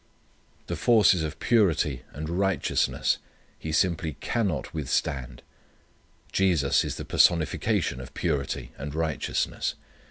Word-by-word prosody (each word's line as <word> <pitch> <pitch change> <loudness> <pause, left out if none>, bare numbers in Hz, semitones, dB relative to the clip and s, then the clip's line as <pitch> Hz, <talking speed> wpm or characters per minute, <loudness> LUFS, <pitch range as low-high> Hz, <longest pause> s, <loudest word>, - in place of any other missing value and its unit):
The - - -3
forces 105 -7 +4
of 80 -1 -4
purity 80 - +2
and 75 +1 -6
righteousness 95 0 +1 0.4
he 80 - -5
simply 80 -1 +1
_can_not 100 - -1
withstand. 65 -4 -2 0.9
Jesus 85 -8 +3
is - - -3
the - - -6
personification 75 -6 +2
of - - -11
purity 65 -3 -2
and 70 +1 -5
righteousness. 80 -1 -1
80 Hz, 105 wpm, -27 LUFS, 70-95 Hz, 0.9 s, forces